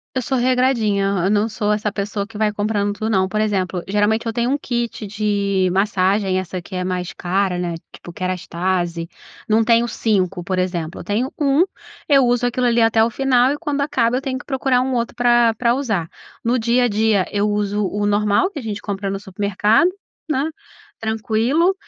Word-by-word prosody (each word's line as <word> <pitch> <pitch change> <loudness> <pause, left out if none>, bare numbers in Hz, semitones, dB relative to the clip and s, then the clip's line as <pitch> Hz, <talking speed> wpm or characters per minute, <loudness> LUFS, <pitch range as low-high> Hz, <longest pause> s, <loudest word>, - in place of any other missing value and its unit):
Eu 260 - 0
sou 265 +2 -1
regradinha, 245 -5 +2
hã, 195 -3 0
eu - - +2
não 210 +1 +2
sou 210 -1 -1
essa 210 0 -1
pessoa 200 0 -3
que 220 0 -12
vai 215 0 +1
comprando 205 -1 -1
tudo, 215 +1 -3
não. 190 -3 +2
Por 215 +2 -1
exemplo, 190 -4 0
geralmente 210 +3 +1
eu 225 - -1
tenho 235 +2 0
um 285 - +1
kit 235 -5 -3
de 200 -2 0
massagem, 195 0 +1
essa 185 0 -3
que 185 - -11
é 180 - -1
mais 180 -1 -3
cara, 185 0 -1
né, 175 -1 -2 0.2
tipo 175 - -11
Kérastase, 175 -1 -2 0.4
não 220 +1 +4
tenho 230 +1 +4
5, 195 -6 0
por 185 +1 -2
exemplo, 175 -3 -2
eu - - -8
tenho 230 +6 -1
1, 285 +2 +4 0.5
eu 275 -4 +5
uso 245 0 +1
aquilo 245 +1 +1
ali 235 0 +3
até 225 0 +4
o 230 - 0
final 260 +1 +3
e 290 - -2
quando 290 -1 -2
acaba 250 -4 +1
eu - - 0
tenho 270 -1 -3
que - - -11
procurar 265 -2 +1
um 260 0 -1
outro 235 -1 -1
pra 240 -1 +3
pra 235 +1 +2
usar. 215 -12 -1 0.4
No 240 +2 +2
dia 240 +2 +2
a - - +3
dia 215 -2 +2
eu 205 0 0
uso 205 0 0
o 205 +2 -2
normal 205 - +2
que 350 - -7
a - - -6
gente 210 -3 -4
compra 200 -1 -3
no 195 0 -3
supermercado, 205 - +2 0.4
né? 280 -3 +1 0.6
Tranquilo 225 - +1
215 Hz, 205 wpm, -20 LUFS, 195-240 Hz, 0.6 s, eu